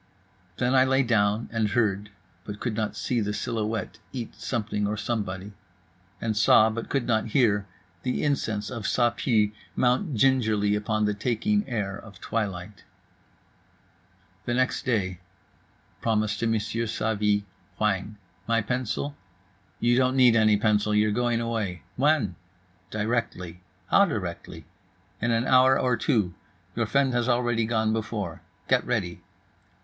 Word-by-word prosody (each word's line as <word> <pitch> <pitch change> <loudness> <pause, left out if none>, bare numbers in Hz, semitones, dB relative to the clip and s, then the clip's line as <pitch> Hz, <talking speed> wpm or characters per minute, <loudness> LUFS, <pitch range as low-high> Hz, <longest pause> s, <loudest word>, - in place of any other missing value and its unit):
Then 125 +1 +1
I 130 -1 +6
lay 135 +1 +3
down, 110 -2 +1
and 115 -2 +1
heard 105 -2 0 0.3
(but 105 +1 -7
could 120 - -2
not 110 -1 -2
see 120 -2 -1
the 105 0 -2
silhouette 110 0 -3
eat 120 -4 -5
something 110 -2 -2
or 105 +1 -2
somebody)… 100 -3 -3 0.7
and 110 -1 -1
saw, 110 +1 +5
but 115 +1 -5
could 135 -4 0
not 110 -1 +1
hear, 105 -4 +2 0.3
the 125 - -1
incense 110 -8 -1
of 115 -4 -5
Ça 120 -1 +2
Pue 110 -5 +2 0.2
mount 130 +5 +1
gingerly 110 -5 +3
upon 105 +1 0
the 105 - +1
taking 130 - 0
air 100 -5 -2
of 100 -2 -12
twilight. 100 -3 -4 1.6
The 120 - 0
next 130 +1 0
day.—Promise 105 +1 -3
to 115 -1 0
M. 110 - +2
Savy. 110 -2 0 0.3
Whang. 105 0 -1 0.3
"My 115 0 +3
pencil?"—"You 105 -3 -3
don't 130 0 +2
need 125 -3 +6
any 110 -2 +5
pencil, 105 0 +2
you're 105 0 +3
going 120 +1 +1
away."—"When?"—"Directly."—"How 95 - -2
directly?"—"In 95 - -6
an 115 +1 +1
hour 130 0 +5
or 125 -1 +2
two: 110 - +1 0.4
your 115 -1 0
friend 135 +2 +2
has 120 0 +1
already 120 -2 +1
gone 110 -1 +1
before. 105 -7 -3 0.3
Get 130 -1 +3
ready." 100 -8 -2
110 Hz, 130 wpm, -26 LUFS, 100-120 Hz, 1.6 s, I